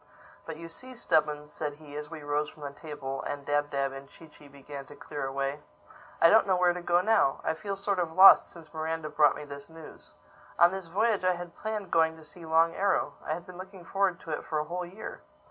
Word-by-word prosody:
"But 160 -1 -6
you 165 +1 -8
see, 255 +10 -9
Stubbins," 150 -7 0
said 150 -2 -3
he 145 -1 -13
as 150 0 -6
we 160 -2 -8
rose 145 +1 -1
from 150 - -14
the 140 - -4
table 140 -2 -6
and 145 -1 -5
Dab 145 0 +1
Dab 140 -1 -1
and 135 0 -10
Chee 165 - -15
Chee 150 -1 -17
began 140 0 -10
to 145 - -12
clear 145 -1 -5
away, 140 +2 -2 0.6
"I 165 - +7
don't 220 -2 +6
know 190 - +3
where 180 -1 +4
to 180 - -6
go 175 0 +3
now. 210 -9 +3
I - - +1
feel 200 +4 -4
sort 200 -1 -1
of 170 -2 -1
lost 185 +4 +8
since 165 -2 -14
Miranda 160 0 -3
brought 150 -2 +4
me - - -7
this 140 0 -9
news. 160 -1 -13 0.5
On 175 0 +6
this 190 -2 -5
voyage 205 +3 +1
I 185 0 +3
had 175 -1 -8
planned 215 -3 -4
going 160 -1 +3
to 160 - -14
see 165 +2 -12
Long 165 +1 +4
Arrow. 195 -7 +1
I 155 - -2
had 170 - -9
been 180 0 -11
looking 190 -2 -10
forward 195 -1 0
to 160 - -8
it 150 - -3
for 155 - -3
a 150 - +1
whole 175 +3 -4
year. 195 +5 -9
160 Hz, 240 wpm, -29 LUFS, 145-180 Hz, 0.6 s, lost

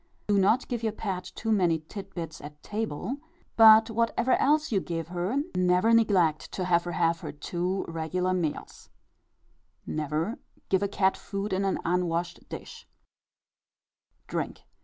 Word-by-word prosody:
Do 205 -1 +3
not 215 +7 +3
give 240 -3 -3
your 220 -2 -1
pet 190 -4 -4
too 225 - -2
many 180 -6 +3
tit 195 -2 -9
bits 165 -3 -6
at 150 0 -11
table; 215 - -3 0.4
but 220 0 +8
whatever 230 +3 +1
else 300 +1 +2
you 200 - +3
give 165 -2 -4
her, 180 +6 -2 0.2
never 180 +5 +3
neglect 185 -9 +3
to 185 - -2
let 175 -1 +3
her 175 - -4
have 165 0 +1
her 155 -4 -6
two 175 +6 -3
regular 165 +3 -1
meals. 170 -5 -4 1.0
Never 155 - -2 0.3
give 190 0 +2
a 200 - +1
cat 190 -1 +2
food 200 0 -4
in 190 +1 0
an 195 - +1
unwashed 175 0 -1
dish. - - -9 1.4
DRINK. - - -4
185 Hz, 150 wpm, -28 LUFS, 170-215 Hz, 1.4 s, but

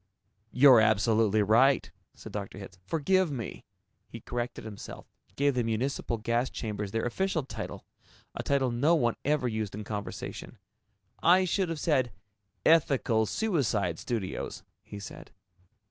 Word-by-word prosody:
"You're 125 -3 +7
absolutely 110 0 +3
right," 125 +6 +4 0.2
said - - -11
Dr. 100 -1 -6
Hitz. 95 -2 -10
"Forgive 180 +3 +2
me." 120 -6 -6 0.4
He - - -9
corrected 120 -1 -5
himself, 105 -2 -9 0.3
gave 140 0 +2
the 125 -1 0
municipal 115 +1 -1
gas 115 +3 0
chambers 105 -3 -4
their 115 +3 -2
official 170 +5 -1
title, 130 - -7 0.5
a - - -4
title 135 -3 +1
no 140 +8 +3
one 120 -7 +1
ever 145 -3 +1
used 110 -3 -3
in 105 - -5
conversation. 105 -1 -6 0.6
"I 185 +2 +5
should 185 0 0
have 165 -2 -3
said, 130 -7 +1 0.5
'Ethical 135 -8 +3
Suicide 115 - 0
Studios,'" 110 -6 -4 0.2
he 105 - -9
said. 100 - -10
120 Hz, 135 wpm, -29 LUFS, 110-145 Hz, 0.6 s, You're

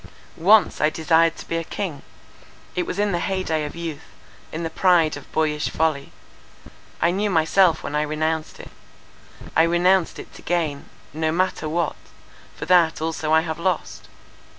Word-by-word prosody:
"Once 200 +5 +4
I 150 - +4
desired 165 +1 +2
to - - -10
be 165 - -2
a 165 - -2
king. 165 -4 -5 0.7
It 180 - -1
was - - -4
in 205 0 +1
the 175 - 0
hey 190 +1 -2
day 155 -3 -1
of 150 - -7
youth, 165 -3 -6 0.5
in 165 +2 -4
the 165 - -3
pride 170 -3 +3
of 145 - -12
boyish 150 -1 0
folly. 155 -3 -1 0.9
I 170 - +2
knew 205 +3 0
myself 165 0 +3
when - - -5
I 150 - +2
renounced 155 +1 -2
it. - - -11 0.8
I 160 - +6
renounced 175 +2 +2
it - - -10
to - - -13
gain 160 -5 -2 0.3
—no 160 +1 -1
matter 175 -2 -1
what—for 165 -1 -6
that 175 -2 +4
also 160 -1 -2
I 160 0 +5
have 160 -1 -5
lost. 180 -1 -2
165 Hz, 170 wpm, -22 LUFS, 155-175 Hz, 0.9 s, I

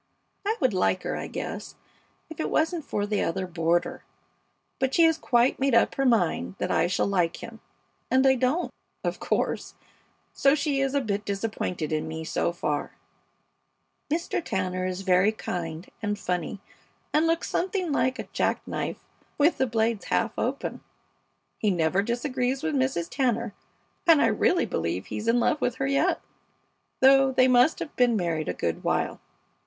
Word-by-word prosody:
I 440 +2 +1
would 255 -7 +2
like 185 0 +1
her, - - -2
I - - -4
guess, - - -6 0.5
if 320 - -11
it - - -1
wasn't 325 +1 +1
for 205 -7 -2
the 205 0 0
other 190 +3 -1
boarder; 170 -1 0 0.8
but 265 0 0
she 335 - +6
has 325 -1 +5
quite 245 -2 +2
made 270 -2 +2
up - - +4
her 270 -1 +1
mind 175 - +1
that - - -2
I - - +3
shall 180 - +1
like 180 -4 0
him, 230 -1 -9 0.5
and 260 +1 +3
I 265 - +6
don't, 260 +7 0 0.3
of - - -2
course, - - -1 0.6
so 275 +1 +4
she 285 -2 0
is 270 0 0
a 280 - +3
bit 205 -4 -2
disappointed 195 -6 -3
in 155 - -1
me 160 0 -5
so 160 - 0
far. 150 -4 -3 1.2
Mr. 335 +1 -1
Tanner 185 - -2
is 185 +1 -4
very 190 +2 +4
kind 170 -5 -5 0.2
and 205 -1 -1
funny, 180 0 -3 0.5
and 310 +2 +3
looks 330 0 0
something 365 -2 -1
like 260 -2 +1
a - - -6
jack - - 0
knife - - -4 0.3
with 300 +4 +3
the 265 - +2
blades 225 -1 0
half - - +1
open. - - -3 0.8
He 215 - +2
never 175 +1 +2
disagrees 255 +4 -1
with 320 -1 -1
Mrs. 260 -11 0
Tanner, 235 -2 0 0.5
and 325 -3 +7
I - - +4
really 360 - +2
believe 85 +3 -2
he's 215 - -5
in 235 +1 +4
love 300 +5 +1
with 245 - 0
her 265 - -2
yet, 275 +1 +1 0.8
though 270 0 +6
they 255 0 +4
must 255 +4 +5
have 300 - -6
been 245 -2 +3
married 165 -5 -1
a - - 0
good 85 - -2
while. - - 0
235 Hz, 170 wpm, -26 LUFS, 185-270 Hz, 1.2 s, and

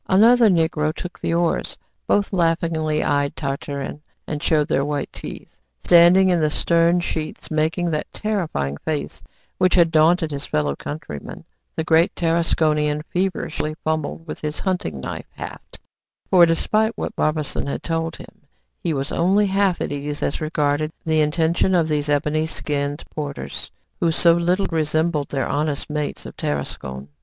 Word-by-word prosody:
Another 225 +4 +6
Negro 160 -3 +2
took 180 +3 -8
the 165 - -1
oars. 170 -1 0 0.3
Both 205 0 +1
laughingly 165 -3 +1
eyed 145 -1 0
Tartarin, 140 0 -4 0.2
and 150 -1 -4
showed 150 -2 +2
their 140 - +1
white 145 -1 -3
teeth. - - -9 0.2
Standing 175 +2 +6
in 175 -2 +3
the 155 -1 +2
stern 170 +3 +2
sheets, 160 -2 -4
making 160 +3 0
that 150 - -3
terrifying 165 - -2
face 155 - -4 0.4
which 185 -1 +3
had 170 -2 +5
daunted 160 +1 +3
his 140 0 -4
fellow 75 -2 0
countrymen, 115 - -7 0.3
the 160 - -1
great 165 +3 +3
Tarasconian 155 -3 +1
feverishly 160 -4 -1
fumbled 155 +1 -2
with 160 - -7
his 150 0 -3
hunting 180 - -2
knife - - -6
haft; - - -9 0.5
for, 175 -2 +7
despite 215 +7 +1
what - - -4
Barbassou 155 -2 -1
had 140 - -4
told 165 0 -2
him, 145 - -15 0.3
he 165 -3 -1
was 135 +1 -3
only 195 +5 +3
half 195 -2 +1
at - - -2
ease 145 +1 -4
as 140 - -1
regarded 155 -1 0
the 160 -1 +2
intention 165 +4 +2
of 165 -3 +3
these 150 -1 -1
ebony 150 +2 +1
skinned 145 -2 -3
porters, 145 -2 -5 0.3
who 170 - +2
so 170 +1 +5
little 175 +3 +1
resembled 155 -1 0
their 135 -2 -1
honest 150 0 -2
mates 150 -1 -3
of - - -9
Tarascon. 70 -2 -4
155 Hz, 155 wpm, -22 LUFS, 150-170 Hz, 0.5 s, for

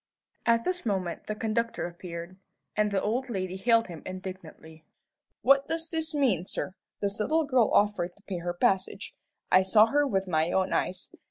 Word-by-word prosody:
At 230 0 +4
this 365 -1 -1
moment 190 -6 -2
the 215 - -2
conductor 225 +2 -1
appeared, 175 +1 -8 0.4
and 210 0 +2
the 200 -1 +1
old 250 +5 -1
lady 185 -4 -3
hailed 230 +3 +3
him 170 -4 -9
indignantly. 185 -4 -9 0.6
"What 275 +1 +5
does 325 0 -3
this 320 -1 -1
mean, 225 - +2
sir? 185 - -3 0.3
This 200 0 -2
little 315 +9 +2
girl 255 -6 +3
offered 190 -4 +2
to 205 - -26
pay 185 -4 -4
her 175 +1 -3
passage. 190 +2 0 0.4
I 185 - +7
saw 210 +3 +6
her 290 +5 +2
with 195 -6 0
my 160 -1 +1
own 190 0 +1
eyes. 185 0 -2
200 Hz, 175 wpm, -28 LUFS, 185-235 Hz, 0.6 s, I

